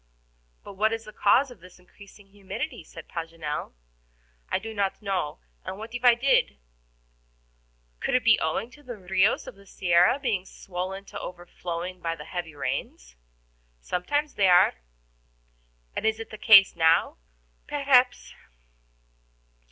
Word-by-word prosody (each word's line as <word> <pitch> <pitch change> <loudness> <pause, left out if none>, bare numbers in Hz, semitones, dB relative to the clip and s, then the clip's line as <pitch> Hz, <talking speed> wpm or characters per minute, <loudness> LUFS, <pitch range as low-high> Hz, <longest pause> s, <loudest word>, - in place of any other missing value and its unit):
"But - - -10
what 215 +3 +1
is 225 0 -5
the 215 - -11
cause 255 +6 +3
of 245 - -14
this 180 +1 -16
increasing 200 +2 -18
humidity?" 195 -3 -6
said 160 0 -12
Paganel. 165 - -5 0.8
"I - - +1
do 220 +3 -7
not 200 -2 -1
know, 195 -7 -2 0.3
and 190 - -6
what 220 +2 -9
if 245 0 -5
I 245 -1 +7
did?" 265 +3 +2 1.4
"Could - - -1
it - - +2
be - - +5
owing 230 +4 -2
to 295 - -17
the 245 -5 -8
RIOS 190 +2 +1
of 260 - -9
the 200 0 -20
Sierra 180 +5 +3
being 230 -10 -1
swollen 190 +1 -6
to - - -8
overflowing 175 0 -6
by 165 -1 -2
the 150 -2 -10
heavy 175 -4 -6
rains?" - - -5 0.6
"Sometimes 290 - -2
they 195 - +3
are." 180 -1 +6 1.2
"And - - -3
is 220 0 +1
it 225 - -8
the 215 - -8
case 200 -3 +7
now?" 165 0 +3 0.5
"Perhaps." 275 -3 +2
195 Hz, 145 wpm, -26 LUFS, 175-225 Hz, 1.4 s, I